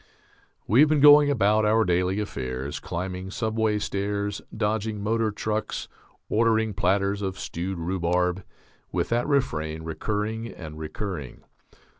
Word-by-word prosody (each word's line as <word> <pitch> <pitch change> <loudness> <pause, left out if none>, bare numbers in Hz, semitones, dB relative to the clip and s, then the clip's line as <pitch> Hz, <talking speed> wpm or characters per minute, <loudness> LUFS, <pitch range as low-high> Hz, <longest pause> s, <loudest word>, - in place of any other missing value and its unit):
We 110 +6 +3
have 150 +1 +7
been 155 -1 +3
going 145 0 +8
about 110 -5 +3
our 110 +1 +3
daily 90 +2 +1
affairs, 65 -7 -4
climbing 90 +2 -5
subway 110 0 0
stairs, 100 0 -2
dodging 110 0 -1
motor 110 +1 +1
trucks, 105 +1 -3 0.4
ordering 110 -1 +2
platters 100 +1 +1
of 95 -1 -3
stewed 90 +2 -4
rhubarb, 90 +1 0 0.5
with - - -1
that 120 +1 +1
refrain 80 - 0
recurring 105 +7 -3
and 80 -2 -9
recurring. 80 - -5
100 Hz, 125 wpm, -26 LUFS, 90-110 Hz, 0.5 s, going